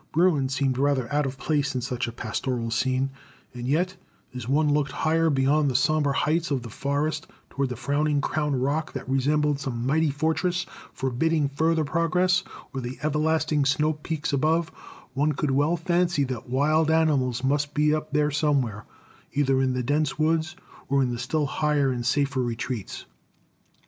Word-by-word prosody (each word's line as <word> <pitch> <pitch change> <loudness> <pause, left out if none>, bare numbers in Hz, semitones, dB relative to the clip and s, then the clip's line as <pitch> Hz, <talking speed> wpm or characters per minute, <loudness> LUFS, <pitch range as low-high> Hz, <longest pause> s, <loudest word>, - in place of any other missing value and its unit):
Bruin 155 -5 +3
seemed 135 -1 0
rather 140 -3 +1
out 145 -1 +2
of 135 0 -6
place 145 -1 -1
in 125 - -1
such 125 0 -2
a - - -4
pastoral 115 +1 -3
scene, 130 +3 0 0.4
and 120 0 -6
yet, 180 +7 +1 0.4
as 125 -2 -6
one 150 +1 +3
looked 145 -2 0
higher 165 +1 +1
beyond 140 +1 +2
the 130 - -3
somber 145 +2 +2
heights 160 +4 0
of 135 -4 -1
the 115 - -8
forest 145 +5 -2 0.2
toward 140 -1 -1
the 125 - -4
frowning 145 +4 0
crown 145 -2 -1
rock 145 +5 -1
that - - -6
resembled 145 +2 +1
some 125 -4 -3
mighty 155 +3 +2
fortress 160 +5 0 0.3
forbidding 145 +4 0
further 160 +3 +1
progress, 180 +4 +2 0.3
or 135 - -3
the 125 +1 -6
everlasting 155 0 +1
snow 150 +3 +2
peaks 150 0 -4
above, 160 +4 +2 0.4
one 145 +3 +1
could 145 0 -1
well 145 +6 +2
fancy 175 -2 +1
that 125 -3 -5
wild 155 +5 +2
animals 140 -6 +2
must 145 +2 0
be 150 0 +3
up 155 0 -3
there 150 0 +2
somewhere, 135 -8 0 0.5
either 135 -1 +2
in 130 -1 +1
the 125 0 -1
dense 145 +3 0
woods 160 +2 +1 0.3
or 140 0 +3
in 125 - 0
the 120 - -4
still 145 +5 0
higher 145 -1 +1
and 120 -1 -3
safer 140 0 +1
retreats. 120 -2 -4
145 Hz, 170 wpm, -25 LUFS, 130-155 Hz, 0.5 s, Bruin